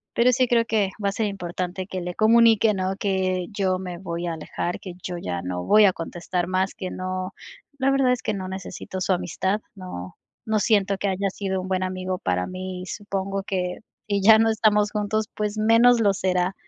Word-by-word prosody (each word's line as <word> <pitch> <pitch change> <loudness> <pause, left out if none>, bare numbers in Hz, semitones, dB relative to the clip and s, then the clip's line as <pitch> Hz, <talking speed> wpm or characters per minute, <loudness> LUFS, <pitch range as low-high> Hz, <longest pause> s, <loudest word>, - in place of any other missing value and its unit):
Pero 245 +2 +5
sí 255 +1 +3
creo 230 -1 +3
que 215 -4 +1
va 200 - +2
a - - -1
ser 220 +1 0
importante 180 -1 -4
que 185 -2 -4
le 175 0 -4
comunique, 225 -1 +5
¿no? 190 0 -1
Que 185 -3 0
yo 190 -3 0
me 180 -2 -6
voy 170 -2 -4
a 170 - -1
alejar, 165 +2 -4
que 185 - -7
yo 180 - -4
ya 90 - -4
no 90 0 -3
voy 210 0 +6
a 190 - +4
contestar 175 +1 -3
más, 185 +1 0
que 185 -4 -5
no 185 +1 -4 0.5
la 265 0 +3
verdad 270 -2 +3
es 250 - -3
que 215 - -1
no 190 -2 -4
necesito 190 0 -6
su 185 - +2
amistad, 190 +4 -1
no 135 - -8 0.3
no 220 -1 +1
siento 200 -2 +2
que 200 - -1
haya 195 +1 0
sido 190 -1 -2
un 185 - -7
buen 185 -1 0
amigo 185 0 -3
para 90 0 -1
mí, 185 0 -6
supongo 195 -1 -3
que 180 -2 -2 0.3
y 200 -1 0
ya 220 +2 +7
no 225 0 +4
estamos 210 -1 +3
juntos, 210 0 -1
pues 210 0 -2
menos 230 +2 +5
lo 200 -2 +4
será, 185 0 0
190 Hz, 210 wpm, -24 LUFS, 185-210 Hz, 0.5 s, ya